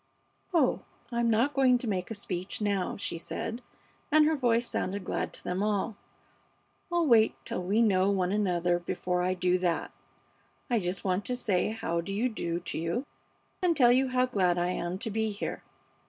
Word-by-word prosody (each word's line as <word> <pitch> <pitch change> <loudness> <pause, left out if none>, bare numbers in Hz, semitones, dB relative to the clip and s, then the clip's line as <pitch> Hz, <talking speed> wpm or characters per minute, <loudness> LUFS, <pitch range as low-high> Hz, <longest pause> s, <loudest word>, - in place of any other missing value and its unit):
"Oh, 320 -8 +2 0.3
I'm 235 0 +1
not 235 +6 +2
going 260 -2 +4
to 245 - -6
make 185 -4 -2
a 225 - -4
speech 190 +2 -4
now," 200 -3 -1
she 170 -4 -4
said, 225 +7 -5 0.5
and 305 0 +6
her 315 +1 +3
voice 240 -3 +2
sounded 195 +1 -2
glad - - -2
to - - -5
them 180 +2 -2
all. 210 +1 0 1.0
"I'll 345 -1 +2
wait 230 -6 +5
till - - -3
we 200 +6 +2
know 190 -3 +3
one 185 -2 +1
another 175 -4 +1
before 180 +1 -2
I 185 +1 +1
do 180 0 +2
that. 175 -2 -1 0.8
I 235 - +3
just 180 0 -3
want 185 +1 0
to 250 - -1
say 205 -7 0
how 170 -6 -2
do 195 - -6
you 230 +6 +1
do 170 -6 -3
to 170 - -4
you, 170 - -2 0.6
and 345 -4 +2
tell 245 -3 +6
you 260 +2 +3
how 255 0 +2
glad 185 -8 +1
I 175 0 +1
am 180 0 -2
to 220 +2 -3
be 220 +1 0
here. 205 -1 -4
205 Hz, 190 wpm, -29 LUFS, 180-240 Hz, 1.0 s, and